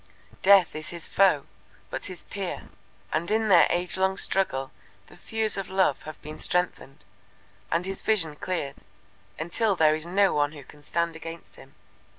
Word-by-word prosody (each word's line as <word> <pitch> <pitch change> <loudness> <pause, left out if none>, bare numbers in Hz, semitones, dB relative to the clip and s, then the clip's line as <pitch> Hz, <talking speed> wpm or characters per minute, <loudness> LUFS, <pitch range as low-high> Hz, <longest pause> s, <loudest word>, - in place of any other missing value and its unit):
Death 195 -4 +6
is 155 0 -5
his 170 -2 -7
foe, 190 -8 +3 0.5
but - - -4
his - - -6
peer, - - -6 0.4
and 170 +2 0
in 220 0 +1
their 175 -3 +7
age 175 +1 0
long 190 0 +1
struggle 135 -9 0 0.3
the - - -17
thews 220 -2 -1
of 195 -2 -4
Love 190 -7 +2
have 155 - -10
been 155 +1 -8
strengthened, 180 - -1 0.7
and 170 +2 +1
his 195 0 -4
vision 165 -9 +2
cleared, 150 -4 -4 0.6
until 195 +6 +1
there 155 -3 +4
is 155 +2 -4
no 195 +2 +3
one 145 0 +1
who 145 -2 -10
can 145 +3 -17
stand 170 +2 -1
against 165 +1 -9
him. - - -16
170 Hz, 165 wpm, -26 LUFS, 155-190 Hz, 0.7 s, their